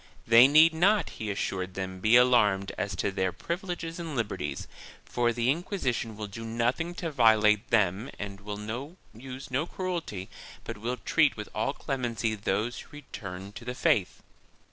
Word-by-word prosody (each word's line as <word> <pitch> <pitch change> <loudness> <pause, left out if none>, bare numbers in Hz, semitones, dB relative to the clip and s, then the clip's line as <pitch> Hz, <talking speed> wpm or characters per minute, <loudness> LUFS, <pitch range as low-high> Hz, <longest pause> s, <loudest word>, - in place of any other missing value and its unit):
They 115 +3 +8
need 155 +3 +6
not, 195 +6 +3
he 110 - -5
assured 95 -2 -3
them, 95 -1 -4
be 110 +5 +4
alarmed 105 -6 +4
as 100 - -3
to - - -1
their 95 -1 0
privileges 170 - -5
and 165 -4 -5
liberties, 105 - -3 0.4
for 120 -1 +1
the 120 +2 +1
Inquisition 135 - -2
will 105 - -4
do 105 +3 -8
nothing 120 +10 -1
to 165 -2 -4
violate 110 -4 +4
them 105 +1 +2
and 100 -1 -7
will 110 - -6 0.2
use 130 +3 -9
no 140 +6 0
cruelty 170 - -4 0.4
but - - -7
will 120 +3 -2
treat 155 -2 +2
with 105 - -6
all 125 +6 -1
clemency 120 -6 -2
those 105 +3 -2
who - - -11
return 100 -9 -8
to 110 - -10
the 125 +1 -5
faith. 95 -6 +1
115 Hz, 165 wpm, -28 LUFS, 105-140 Hz, 0.4 s, They